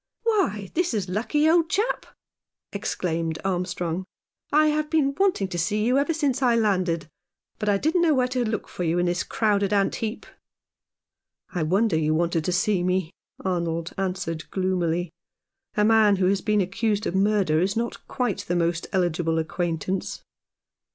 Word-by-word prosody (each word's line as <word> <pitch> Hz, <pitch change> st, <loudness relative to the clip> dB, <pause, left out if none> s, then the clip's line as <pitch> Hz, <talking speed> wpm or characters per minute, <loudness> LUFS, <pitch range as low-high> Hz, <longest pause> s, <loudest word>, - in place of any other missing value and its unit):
" -, -, -54 dB
Why, 215 Hz, -, 0 dB
this 340 Hz, -7 st, 0 dB
is 195 Hz, -4 st, -2 dB
lucky, 250 Hz, +10 st, +1 dB
old 330 Hz, 0 st, +4 dB
chap! 425 Hz, +8 st, 0 dB, 0.3 s
" -, -, -66 dB, 0.3 s
exclaimed 170 Hz, -5 st, -2 dB
Armstrong. 180 Hz, -1 st, -2 dB, 0.3 s
" -, -, -66 dB
I 305 Hz, +1 st, +5 dB
have 300 Hz, 0 st, 0 dB
been 295 Hz, -4 st, +2 dB
wanting 365 Hz, -, +1 dB
to 175 Hz, -, -3 dB
see 210 Hz, +5 st, 0 dB
you 250 Hz, +3 st, +3 dB
ever 290 Hz, +4 st, +1 dB
since 285 Hz, -5 st, 0 dB
I 245 Hz, -3 st, +4 dB
landed, 185 Hz, -7 st, +1 dB, 0.5 s
but 210 Hz, -1 st, 0 dB
I 200 Hz, -, +3 dB
didn't 320 Hz, -, +1 dB
know 320 Hz, -3 st, +4 dB
where 255 Hz, -1 st, +2 dB
to 255 Hz, -1 st, 0 dB
look 220 Hz, -2 st, -2 dB
for 180 Hz, -, -5 dB
you 165 Hz, +1 st, +1 dB
in 175 Hz, -, +2 dB
this 175 Hz, 0 st, 0 dB
crowded 205 Hz, -3 st, +1 dB
ant 200 Hz, -1 st, +2 dB
heap." 220 Hz, +1 st, -4 dB, 0.7 s
" -, -, -58 dB
I 175 Hz, -, -1 dB
wonder 190 Hz, +4 st, +2 dB
you 155 Hz, 0 st, +1 dB
wanted 170 Hz, 0 st, +1 dB
to -, -, 0 dB
see 190 Hz, +1 st, +1 dB
me," 180 Hz, -1 st, 0 dB, 0.3 s
Arnold 170 Hz, -2 st, -1 dB
answered 180 Hz, -4 st, -3 dB
gloomily. 175 Hz, -3 st, -1 dB, 0.7 s
"A 210 Hz, -, +4 dB
man 220 Hz, -2 st, +5 dB
who 185 Hz, -1 st, +1 dB
has 195 Hz, 0 st, +1 dB
been 210 Hz, -2 st, +2 dB
accused 210 Hz, +2 st, -1 dB
of -, -, -1 dB
murder 195 Hz, -5 st, +2 dB
is 195 Hz, +4 st, 0 dB
not 235 Hz, +1 st, -3 dB
quite 245 Hz, -7 st, -1 dB
the 175 Hz, -, 0 dB
most 170 Hz, 0 st, 0 dB
eligible 175 Hz, -3 st, 0 dB
acquaintance." 170 Hz, +2 st, -2 dB
195 Hz, 180 wpm, -25 LUFS, 175-230 Hz, 0.7 s, I